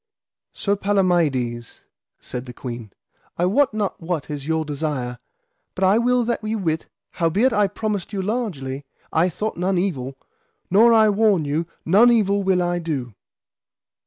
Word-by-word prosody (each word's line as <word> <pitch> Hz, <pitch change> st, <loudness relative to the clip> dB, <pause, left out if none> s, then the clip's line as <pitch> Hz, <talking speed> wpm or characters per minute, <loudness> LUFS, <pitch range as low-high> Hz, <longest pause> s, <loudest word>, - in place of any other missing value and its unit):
Sir 200 Hz, 0 st, 0 dB
Palamides, 165 Hz, -, 0 dB, 0.4 s
said 125 Hz, 0 st, -6 dB
the 125 Hz, -, -8 dB
queen, 120 Hz, -4 st, -7 dB, 0.5 s
I 175 Hz, -, +2 dB
wot 260 Hz, +9 st, +3 dB
not 210 Hz, -4 st, -3 dB
what 165 Hz, -3 st, -3 dB
is 145 Hz, -1 st, -5 dB
your 160 Hz, -1 st, 0 dB
desire, 140 Hz, -5 st, -3 dB, 0.6 s
but 190 Hz, -, -2 dB
I 195 Hz, +4 st, +5 dB
will 245 Hz, +1 st, +2 dB
that 235 Hz, -1 st, -2 dB
ye 215 Hz, +1 st, -1 dB
wit, 160 Hz, -6 st, -2 dB, 0.2 s
howbeit 195 Hz, +9 st, +2 dB
I 205 Hz, -1 st, +3 dB
promised 205 Hz, -1 st, -3 dB
you 195 Hz, -3 st, -2 dB
largely, 170 Hz, -, -3 dB, 0.3 s
I 170 Hz, +3 st, +3 dB
thought 215 Hz, +6 st, -4 dB
none 185 Hz, +2 st, 0 dB
evil, 135 Hz, -8 st, -2 dB, 0.5 s
nor 225 Hz, +5 st, +6 dB
I 220 Hz, -1 st, +6 dB
warn 200 Hz, -6 st, +3 dB
you 155 Hz, +4 st, -1 dB, 0.2 s
none 205 Hz, +9 st, +6 dB
evil 200 Hz, -4 st, +3 dB
will 190 Hz, -2 st, +2 dB
I 175 Hz, 0 st, 0 dB
do. 140 Hz, -9 st, -4 dB
180 Hz, 155 wpm, -22 LUFS, 150-210 Hz, 0.6 s, nor